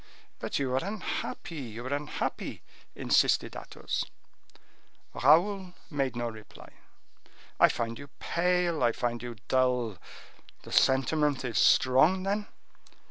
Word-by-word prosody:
"But - - -2
you 135 -2 -1
are 130 - +1
unhappy! 190 -5 -4
you 120 -1 -7
are 130 - -2
unhappy!" 145 +1 -3 0.3
insisted - - +2
Athos. - - -4 1.1
Raoul 180 +6 +3 0.2
made 135 -4 -1
no 120 0 -2
reply. 110 -2 -11 0.9
"I - - +7
find 115 0 -3
you 140 - -9
pale; 175 -2 +1
I 120 -2 +3
find 120 0 -2
you 120 -1 -6
dull. 125 -6 +1 0.6
The - - -11
sentiment 135 +1 +2
is 115 - 0
strong, 155 +9 +5
then?" 205 +2 -1
135 Hz, 120 wpm, -29 LUFS, 120-170 Hz, 1.1 s, I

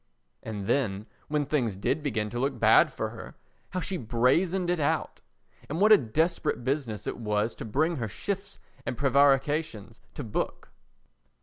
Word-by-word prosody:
And 105 -3 -5
then 105 -5 0 0.2
when 150 -1 0
things 130 -8 0
did 100 +10 -1
begin 110 -7 -2
to 120 - -3
look 135 0 -1
bad - - +6
for - - -3
her, - - -10 0.3
how 185 - -3
she 190 -1 -2
brazened 165 - +1
it 175 - 0
out, 145 - -1 0.5
and 155 +4 -3
what 210 +2 +5
a 215 - +10
desperate 155 +4 0
business 130 -5 -2
it - - -3
was 105 -1 -1
to - - -8
bring 155 +9 0
her 115 -4 -2
shifts 195 - -5 0.3
and 125 - -4
prevarications 140 -3 +2
to 145 - -5
book! 110 - -4
135 Hz, 165 wpm, -28 LUFS, 110-155 Hz, 0.5 s, a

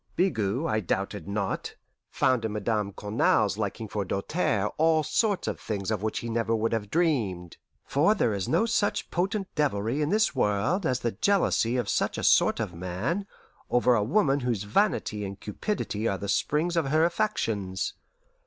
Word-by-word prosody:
Bigot, 125 - 0
I 110 -5 +1
doubted 100 -1 -3
not, 100 -1 -3 0.3
found 130 -3 +1
in 110 -1 -2
Madame 105 -1 -1
Cournal's 105 0 +1
liking 110 +1 -3
for 105 0 -2
Doltaire 100 - -1
all 160 0 +4
sorts 205 +4 0
of - - -3
things 100 -1 -3
of 105 -3 -1
which 110 0 -2
he 115 - -5
never 115 0 0
would 115 +1 0
have 105 -3 -2
dreamed; 110 - 0 0.3
for 165 +10 +3
there 115 - +1
is 100 -2 -3
no 170 +8 +3
such 220 -3 0
potent 195 +2 -1
devilry 130 -2 0
in 150 - 0
this 215 +2 +2
world 125 - +1
as 125 -1 0
the 120 - 0
jealousy 130 - +1
of 120 -4 -1
such - - 0
a - - -4
sort - - +4
of 90 - -3
man 95 - -3 0.4
over 125 0 +3
a 110 - +3
woman 140 - +2
whose 120 -6 -1
vanity 105 - 0
and 100 0 -6
cupidity 110 - -3
are 100 - 0
the 100 - -6
springs 155 - +1
of 165 -4 +1
her 155 +4 +3
affections. 110 - -1
115 Hz, 175 wpm, -27 LUFS, 100-160 Hz, 0.4 s, all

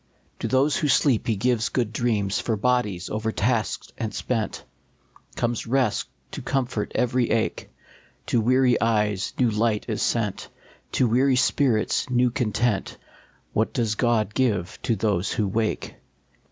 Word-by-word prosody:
To - - -2
those 135 +3 +2
who 160 -5 0
sleep 135 -4 +3
he 115 - +2
gives 120 +2 +1
good 120 -4 -1
dreams; 110 -4 0
For 110 -2 -1
bodies 105 -6 0
overtasked 110 +1 -1
and 110 -1 -2
spent 115 -4 -2 0.7
Comes 120 -1 -2
rest 130 +1 +1 0.2
to - - -6
comfort 125 -6 -2
every 125 -1 +1
ache; 110 0 -1 0.6
To 120 - +1
weary 125 +1 +3
eyes 105 -3 +1
new 125 -3 +3
light 110 0 0
is 110 -3 -2
sent, 105 -5 -1 0.4
To 130 - +3
weary 130 +4 +3
spirits 125 -3 +1
new 125 0 +2
content; 120 -4 -1 0.6
What 110 - 0
does 115 -4 0
God 110 -2 +1
give 105 -9 0
to 115 - 0
those 100 -4 0
who 105 - 0
wake 110 +3 -2
115 Hz, 140 wpm, -24 LUFS, 105-125 Hz, 0.7 s, sleep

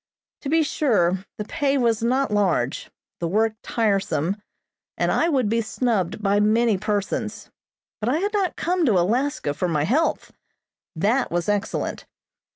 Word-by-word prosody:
To 275 - -4
be 320 +1 +3
sure, 195 - +1
the 210 - -4
pay 280 +4 0
was 230 -3 +1
not 255 +2 +1
large, 180 -11 0 0.3
the 170 - -1
work 220 +5 +1
tiresome, 195 -4 0 0.6
and - - +1
I 335 - +2
would 265 -8 +2
be 230 +2 +1
snubbed 215 -4 -1
by 200 0 +3
many 220 +1 +3
persons, 205 -1 -3 0.5
but 220 - -1
I 280 - +2
had 405 +5 -1
not 390 -4 0
come 355 +1 0
to 210 -6 +4
Alaska 225 - 0
for 180 - -1
my 155 -4 0
health. 280 - 0 0.6
That 225 +10 +1
was 175 0 -1
excellent. 205 -1 -2
215 Hz, 155 wpm, -23 LUFS, 195-265 Hz, 0.6 s, to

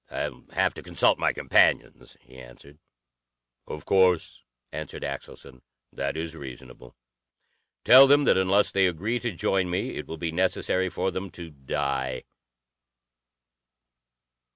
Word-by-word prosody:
"I'll - - -5
have - - +1
to - - -10
consult - - +1
my - - +2
companions," - - +1
he 65 - -16
answered. 65 +4 -15 0.9
"Of 75 - -8
course," 90 -3 +2 0.3
answered 80 -2 -7
Axelson. 65 -2 -8 0.3
"That 70 +3 -3
is 80 0 -5
reasonable. 65 -3 -12 0.9
Tell 135 +2 +9
them 145 +1 +5
that - - +3
unless 95 +2 +2
they 95 -1 +3
agree 100 +8 -2
to 120 -1 -3
join 95 0 -1
me 90 - -2
it - - -7
will 80 - -7
be 80 0 -3
necessary 95 +1 0
for 90 +2 -2
them 95 +1 -5
to 85 -2 -10
die. 65 -2 -3
85 Hz, 130 wpm, -25 LUFS, 70-95 Hz, 0.9 s, Tell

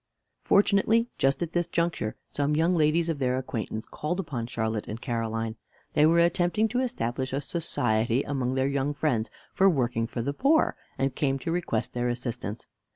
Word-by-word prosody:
Fortunately, 215 +4 +3
just 135 +5 +2
at 170 - -5
this 175 -1 +1
juncture 170 -10 -1
some 145 +1 0
young 165 +4 +3
ladies 160 +1 +3
of 160 -4 -2
their 130 -1 +1
acquaintance 115 -3 -4
called 165 +5 -3
upon 135 -10 -3
Charlotte 110 -2 -2
and 110 - -5
Caroline. 115 -2 -2 0.4
They 150 +1 +5
were 165 +1 +4
attempting 175 +5 +3
to 245 +4 0
establish 130 - -2
a 135 - +1
society 120 -6 0
among 130 -2 -1
their 130 0 +2
young 140 +1 -1
friends 125 -7 0 0.2
for 195 +1 +5
working 120 -7 0
for 120 0 -4
the 140 +3 -1
poor, 295 - +3 0.2
and 135 -1 0
came 135 0 0
to 150 +5 -4
request 165 -10 -1
their 120 0 0
assistance. 120 -3 -4
140 Hz, 175 wpm, -27 LUFS, 120-170 Hz, 0.4 s, They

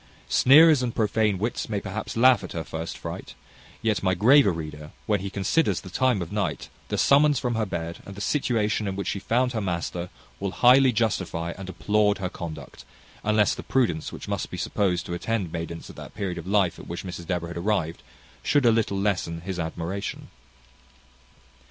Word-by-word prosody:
Sneerers 150 +2 +7
and 120 -2 -2
prophane 105 -2 +1
wits 115 +4 -3
may 105 -2 -1
perhaps 100 +3 -5
laugh 120 -3 +5
at 95 - -7
her 80 - -3
first 80 +1 -6
fright; - - -7 0.5
yet 110 -2 +1
my 95 -1 +1
graver 125 +4 +6
reader, 75 -2 -7 0.2
when 105 -2 +1
he 100 +2 -4
considers 100 +12 +1
the - - -11
time 125 -8 +1
of 85 - -10
night, 100 -6 -2 0.2
the - - -2
summons 145 +1 +5
from 120 0 -1
her 110 -2 -1
bed, 85 -2 -4
and 100 - -10
the - - -8
situation 110 -3 0
in 95 - -2
which 100 - -3
she 100 - -2
found 125 +5 +1
her 110 - -1
master, 85 -1 -3 0.3
will 100 - -2
highly 130 +1 +6
justify 95 -7 -1
and 95 -1 -8
applaud 105 +1 +1
her 95 -2 -3
conduct, 85 -4 -8 0.4
unless 105 -1 +3
the - - -6
prudence 105 -12 0
which - - -8
must - - -3
be - - -6
supposed 95 -4 0
to 85 - -5
attend 95 0 -2
maidens 85 0 -5
at - - -12
that - - -10
period 95 -5 -3
of 85 - -9
life 95 -3 +2
at - - -11
which 85 - -5
Mrs 90 -3 -7
Deborah 90 -2 -2
had 85 - -6
arrived, 85 -6 -1 0.4
should 145 -3 +2
a 115 - +7
little 110 -3 +1
lessen 90 -4 -1
his 90 0 -5
admiration. 85 +4 -4
100 Hz, 195 wpm, -25 LUFS, 85-115 Hz, 0.5 s, Sneerers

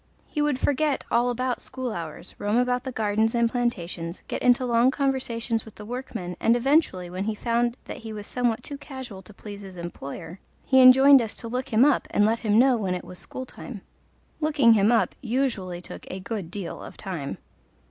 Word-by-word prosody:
He 295 - -2
would 295 -3 +1
forget 290 +1 +1
all 240 +1 +3
about 250 +1 -1
school 260 -2 -4
hours, 165 -4 -7
roam 205 +3 +1
about 250 +1 +1
the 260 - -3
gardens 220 0 +1
and 235 0 +3
plantations, 180 -8 -3
get - - -4
into 250 0 +4
long 240 +1 +4
conversations 250 -5 -1
with 220 - -14
the 210 - -10
workmen, 225 -7 -5
and 230 - +4
eventually, 245 - +2
when 185 +3 -4
he 220 0 -1
found 235 +2 0
that - - -7
he 225 -1 -8
was 210 -1 -6
somewhat 245 -1 -1
too 285 -1 -7
casual 260 -9 -8
to 190 - -14
please 205 0 -9
his 190 -2 -10
employer, 170 +1 -7 0.3
he 265 -1 +5
enjoined 265 +2 +8
us 225 -3 -4
to 230 - -7
"look 250 +3 -3
him 230 +4 +5
up" 290 -3 +2
and 205 - +3
let 225 +2 +2
him 210 -1 +2
know 255 +1 +5
when 190 -4 -1
it 180 - -6
was 180 - -7
school 260 - -6
time. 240 -4 -9 0.6
Looking 295 -7 +4
him 210 +1 +4
up 235 - +2
usually 225 -9 -1
took - - -9
a 185 - -5
good 190 -3 -5
deal 190 -2 -6
of - - -10
time. 170 -8 -5
230 Hz, 205 wpm, -25 LUFS, 200-255 Hz, 0.6 s, enjoined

